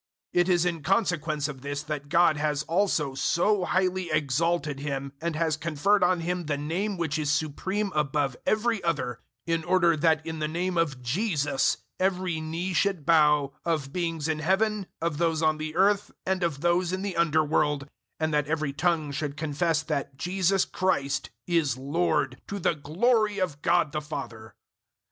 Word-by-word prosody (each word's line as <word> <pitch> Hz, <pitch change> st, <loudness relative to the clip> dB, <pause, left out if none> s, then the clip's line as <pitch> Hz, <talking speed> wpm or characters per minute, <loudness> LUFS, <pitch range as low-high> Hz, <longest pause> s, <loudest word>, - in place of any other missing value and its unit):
002:009 175 Hz, -, +4 dB
It 175 Hz, -, 0 dB
is 175 Hz, -1 st, +3 dB
in 170 Hz, -3 st, -1 dB
consequence 165 Hz, -6 st, 0 dB
of 135 Hz, -3 st, -8 dB
this 145 Hz, +1 st, -4 dB
that 150 Hz, -2 st, -5 dB
God 170 Hz, 0 st, +4 dB
has 150 Hz, 0 st, -1 dB
also 165 Hz, -4 st, +1 dB
so 180 Hz, +8 st, +1 dB
highly 185 Hz, 0 st, 0 dB
exalted 155 Hz, 0 st, 0 dB
Him, 140 Hz, -1 st, -4 dB
and 170 Hz, -1 st, -2 dB
has 160 Hz, -1 st, +1 dB
conferred 170 Hz, +6 st, +1 dB
on 180 Hz, -1 st, +2 dB
Him 175 Hz, -1 st, -2 dB
the 145 Hz, -1 st, 0 dB
Name 180 Hz, +8 st, -2 dB
which 160 Hz, -3 st, -1 dB
is 150 Hz, -1 st, 0 dB
supreme 190 Hz, +7 st, -1 dB
above 145 Hz, -3 st, 0 dB
every 220 Hz, -1 st, +1 dB
other, 130 Hz, -8 st, -1 dB, 0.3 s
002:010 165 Hz, -, +1 dB
in 165 Hz, -, -8 dB
order 175 Hz, -1 st, +3 dB
that 160 Hz, 0 st, +2 dB
in 160 Hz, -1 st, -5 dB
the 155 Hz, -, 0 dB
Name 175 Hz, +3 st, -2 dB
of 145 Hz, -7 st, 0 dB
JESUS 145 Hz, -, +1 dB, 0.2 s
every 185 Hz, -3 st, 0 dB
knee 165 Hz, +4 st, -3 dB
should 180 Hz, -3 st, +1 dB
bow, 150 Hz, -3 st, +4 dB
of 155 Hz, -5 st, -1 dB
beings 165 Hz, -4 st, -2 dB
in 160 Hz, -1 st, -1 dB
Heaven, 195 Hz, +4 st, +1 dB
of 165 Hz, -2 st, -2 dB
those 165 Hz, -2 st, +1 dB
on 155 Hz, -1 st, +2 dB
the 155 Hz, 0 st, -5 dB
earth, 200 Hz, +2 st, +3 dB, 0.2 s
and 190 Hz, 0 st, 0 dB
of 165 Hz, -5 st, -1 dB
those 175 Hz, +1 st, +2 dB
in 185 Hz, +1 st, -2 dB
the 200 Hz, -2 st, -3 dB
underworld, 150 Hz, -3 st, +2 dB
002:011 -, -, -16 dB, 0.3 s
and 160 Hz, -1 st, 0 dB
that 150 Hz, -1 st, +1 dB
every 155 Hz, -2 st, -1 dB
tongue 160 Hz, -1 st, 0 dB
should 145 Hz, 0 st, -3 dB
confess 160 Hz, +1 st, 0 dB
that 140 Hz, -3 st, -3 dB
JESUS 185 Hz, +3 st, +1 dB
CHRIST 140 Hz, -8 st, -1 dB, 0.2 s
is 160 Hz, -8 st, +1 dB
LORD, 145 Hz, -1 st, 0 dB
to 200 Hz, -, -4 dB
the 180 Hz, -, +1 dB
glory 210 Hz, -, +1 dB
of 175 Hz, -7 st, -2 dB
God 175 Hz, -4 st, +2 dB
the 150 Hz, 0 st, -2 dB
Father. 115 Hz, -7 st, -7 dB
160 Hz, 180 wpm, -27 LUFS, 150-180 Hz, 0.3 s, 002:009